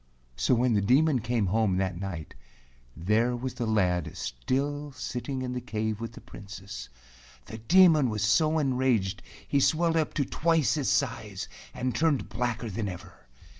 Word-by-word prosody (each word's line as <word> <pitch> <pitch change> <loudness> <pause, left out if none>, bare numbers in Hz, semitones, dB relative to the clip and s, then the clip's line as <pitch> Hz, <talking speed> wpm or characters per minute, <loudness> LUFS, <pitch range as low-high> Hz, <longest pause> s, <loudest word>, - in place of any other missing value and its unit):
So 65 - +2
when 120 0 +2
the 105 - +3
Demon 135 +6 +3
came 115 -1 0
home 100 -1 +1
that 95 -2 -1
night, 90 -5 -6 0.6
there 110 +8 +1
was 125 +1 -4
the 120 - -3
lad 90 -5 0
still 140 - -2
sitting 130 +1 -4
in 125 0 -3
the 125 - -3
cave 110 -2 -3
with 115 0 -5
the - - -11
Princess. 100 -3 -9 0.6
The 110 - -8
Demon 155 +1 +5
was 105 -2 -2
so 155 +8 +3
enraged 125 -8 +1 0.3
he 140 - +2
swelled 165 +4 +2
up 155 -2 0
to 140 - +1
twice 165 +1 +2
his 145 -4 0
size - - -1 0.2
and 125 -1 -2
turned 150 +2 +1
blacker 120 +2 -2
than 105 +1 -3
ever. 90 -7 -11
120 Hz, 165 wpm, -28 LUFS, 105-140 Hz, 0.6 s, Demon